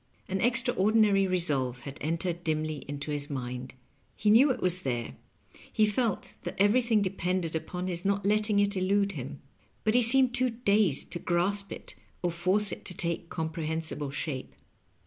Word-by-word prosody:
An 190 0 -2
extraordinary 215 -5 +3
resolve 140 -9 0
had 140 +2 -8
entered 170 +2 -2
dimly 155 -2 -2
into 145 +1 -5
his 145 -1 -2
mind. 125 -2 -5 0.4
He 210 - +2
knew 255 +7 +7
it 255 - 0
was 180 0 +2
there, 120 - -3 0.6
he 215 - +3
felt 215 0 -1
that - - -5
everything 220 +1 +3
depended 180 -3 -1
upon 180 +3 -4
his 175 -2 -2
not 200 0 0
letting 210 0 +2
it 200 0 +2
elude 200 +2 +1
him; - - -7 0.4
but 215 - +2
he 245 - +5
seemed 250 +1 +4
too 255 +1 +2
dazed 210 - +1
to 175 - -3
grasp 195 +4 0
it - - -8 0.3
or 175 - +1
force 185 +4 +2
it - - -6
to 180 - -8
take 170 0 -2
comprehensible 160 -2 -3
shape. 140 -1 -5
185 Hz, 165 wpm, -29 LUFS, 160-210 Hz, 0.6 s, knew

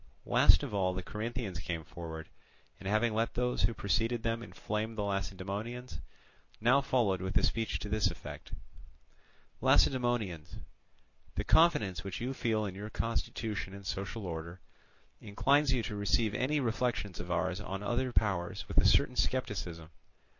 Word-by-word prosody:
Last - - +6
of - - -4
all 95 -2 +1
the 95 - -3
Corinthians 110 -2 -4
came 85 -2 -3
forward, 80 0 -7 0.5
and 95 - -4
having 110 +2 +2
let 115 +1 0
those 125 0 0
who 115 - +2
preceded 115 +4 0
them 115 0 0
inflame 110 -1 -3
the 105 - -1
Lacedaemonians, 100 +5 -3 0.6
now 125 +5 +5
followed 115 -9 +1
with 95 0 0
a - - +1
speech 115 -1 0
to - - -6
this 105 -2 +2
effect: 85 - -9 1.1
"Lacedaemonians! 110 - +2 0.8
the - - -1
confidence 100 - +4
which 95 -2 -5
you 125 +3 -2
feel 110 -4 0
in 95 - -4
your 105 +3 -6
constitution 110 -3 -3
and 100 0 -10
social 100 +3 -4
order, 85 +1 -5 0.6
inclines 135 +7 +2
you 125 -3 +1
to 105 -1 -4
receive 105 +2 +1
any 130 +7 +1
reflections 115 -5 -1
of 90 0 -6
ours 90 +2 0
on 95 0 -5
other 125 +4 0
powers 95 -7 0
with - - +3
a - - +3
certain 125 - +4
scepticism. 90 -12 -2
105 Hz, 155 wpm, -32 LUFS, 95-120 Hz, 1.1 s, Last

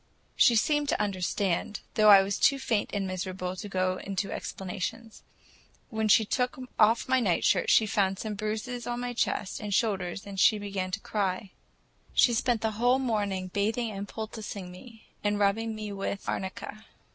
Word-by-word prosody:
She 240 - +5
seemed 295 +5 +2
to - - +1
understand, 195 -1 -1
though 215 -1 +5
I 195 -2 +9
was 195 0 -2
too 275 - +4
faint 225 -5 -1
and 200 -2 -1
miserable 185 0 -4
to 205 +2 -7
go 185 -1 0
into 195 +1 -3
explanations. 205 +4 -5 0.7
When 220 -1 0
she 215 +1 +5
took 250 +4 -1 0.2
off 225 +2 +4
my 260 0 +3
nightshirt, 195 -8 +2
she 220 - +6
found 195 -2 +1
such 215 +1 -4
bruises 220 +4 -4
on 240 0 -2
my 245 0 -3
chest 210 -4 -1
and 210 -2 -5
shoulders 195 -3 0
that 200 -1 -7
she 215 - +5
began 200 -2 -3
to 190 +2 -3
cry. 195 -2 -2 0.6
She 240 - +5
spent 230 0 +1
the 220 - 0
whole 245 +2 +4
morning 205 -7 -1
bathing 220 +3 0
and 200 0 -5
poulticing 215 -4 -6
me, 225 +4 -14 0.2
and 205 0 +1
rubbing 220 +2 +1
me 215 -1 -5
with 195 0 -4
arnica. 195 +3 -5
210 Hz, 170 wpm, -28 LUFS, 195-225 Hz, 0.7 s, I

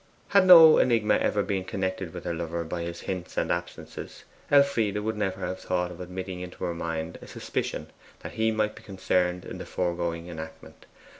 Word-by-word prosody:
Had 200 -2 +5
no 165 -3 +10
enigma 115 -4 +3
ever 105 -1 +1
been 95 -1 -2
connected 95 -2 -3
with 90 -2 -8
her - - -2
lover 85 0 -3
by 85 +1 -4
his 85 0 -5
hints 90 -2 -5
and - - 0
absences, 85 0 -6 0.3
Elfride 140 -8 +3
would 110 +1 -2
never 100 -3 -2
have 95 - -3
thought 90 -1 -1
of 90 0 -9
admitting 90 0 -6
into 90 0 -8
her 85 - -1
mind 80 0 -4
a - - -11
suspicion - - -4 0.4
that - - -7
he 110 0 +1
might 110 -1 0
be - - -13
concerned 90 -2 -1
in - - -7
the - - -6
foregoing 85 -1 -2
enactment. 80 -2 -10
90 Hz, 190 wpm, -27 LUFS, 85-105 Hz, 0.4 s, no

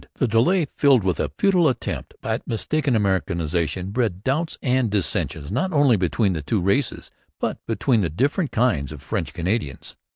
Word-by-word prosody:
The 130 - +1
delay, 130 - +3
filled 135 -7 +5
with 90 -2 0
a - - 0
futile 185 -7 +4
attempt 130 - -4
at - - -3
mistaken 140 +4 0
Americanization, 90 -2 -1
bred 105 -5 -1
doubts 155 +6 -1
and 125 -3 +2
dissensions 85 -5 -1
not 140 - 0
only 145 -6 +4
between 95 +2 +1
the 80 - -3
two 95 +9 -1
races 100 +9 -1 0.3
but - - -3
between 120 -5 +1
the 85 - 0
different 140 - 0
kinds 100 - +1
of 75 -3 -10
French - - -3
Canadians. 90 - -3
115 Hz, 165 wpm, -23 LUFS, 90-135 Hz, 0.3 s, filled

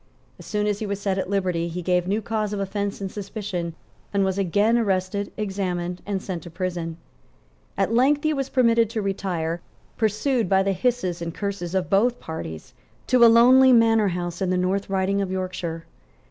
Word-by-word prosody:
As - - -12
soon 210 -1 -1
as 205 -1 0
he 215 - -3
was 200 0 -3
set 195 -1 -1
at 190 - -3
liberty 180 -4 0
he 175 +1 -5
gave 180 0 +1
new 210 +3 0
cause 215 -2 -2
of 205 - -2
offence 200 +1 -3
and 195 -1 -4
suspicion, 195 -5 -5 0.4
and 200 -1 +2
was 190 +1 -1
again 205 +5 +2
arrested, 200 -2 0
examined 185 -4 -3
and 195 -2 -2
sent 180 -3 -4
to 170 - -10
prison. 170 -2 -4 0.8
At 195 +3 +1
length 275 +5 +3
he 310 0 +2
was 275 -2 -2
permitted 230 -3 +3
to 225 -1 -2
retire, 175 -4 -2 0.4
pursued 220 0 +1
by 190 0 +4
the 195 0 +1
hisses 185 -4 -1
and 170 -1 -5
curses 195 -3 -4
of 185 -2 0
both 230 +5 +3
parties, 80 - -7 0.3
to 250 -1 +4
a - - +10
lonely 255 +3 +7
manor 225 -2 +4
house 175 -1 -3
in 190 - +1
the 185 - +1
North 190 +2 0
Riding 195 +1 +1
of 195 - -2
Yorkshire. 185 -3 -4
195 Hz, 190 wpm, -24 LUFS, 180-215 Hz, 0.8 s, a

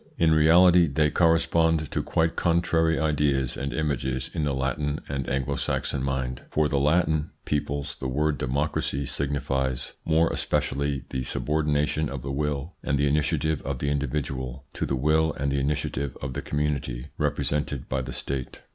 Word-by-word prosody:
In 80 -1 +4
reality 85 +3 +6
they 75 +1 +2
correspond 80 -1 +3
to - - 0
quite 80 0 0
contrary 85 -1 +2
ideas 70 -4 +1
and 70 0 -3
images 65 -4 -2
in 80 - -1
the 70 - 0
Latin 70 +3 -1
and 70 -1 -3
Anglo 65 -1 -1
Saxon 70 - -1
mind. 65 -2 -2
For 75 0 +2
the 70 -2 +1
Latin 80 +1 +2 0.2
peoples 70 -1 -2
the 65 - -3
word 75 +3 0
"democracy" 70 +1 -1
signifies 65 -2 -1
more 80 +1 +3
especially 70 -1 -1
the 65 - -2
subordination 75 +2 0
of 70 -3 -6
the 70 - -3
will 75 +3 -2
and 70 - 0
the 70 +1 +2
initiative 75 +1 +1
of 70 -1 -3
the 70 +3 -1
individual 70 -2 -3
to - - -2
the 70 - 0
will 80 +4 +2
and 70 -1 -2
the 70 - +1
initiative 70 -1 -2
of 65 -1 -4
the - - -3
community 70 -3 -2
represented 70 -2 -1
by 65 0 -1
the 65 - -6
State. 65 -2 -4
70 Hz, 165 wpm, -26 LUFS, 65-75 Hz, 0.2 s, reality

